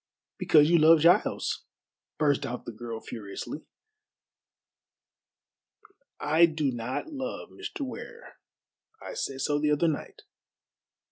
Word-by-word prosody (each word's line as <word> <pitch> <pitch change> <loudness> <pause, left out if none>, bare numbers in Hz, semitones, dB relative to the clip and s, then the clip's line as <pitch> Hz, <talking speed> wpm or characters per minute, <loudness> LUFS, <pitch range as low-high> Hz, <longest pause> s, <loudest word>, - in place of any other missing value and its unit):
"Because 150 -2 +5
you 170 +1 +5
love 160 0 +7
Giles," 170 +3 +2 0.5
burst 145 -2 +2
out 125 -2 -5
the - - -5
girl 115 0 -7
furiously. 105 +8 -7 2.5
"I 160 +3 +4
do 155 -4 -1
not 125 - -4
love 265 -2 -5
Mr. - - -8
Ware. 455 - -8 0.6
I - - -8
said 135 - -4
so 145 +1 +1
the 150 0 +1
other 150 +3 +2
night." 155 -3 -4
150 Hz, 115 wpm, -28 LUFS, 130-170 Hz, 2.5 s, love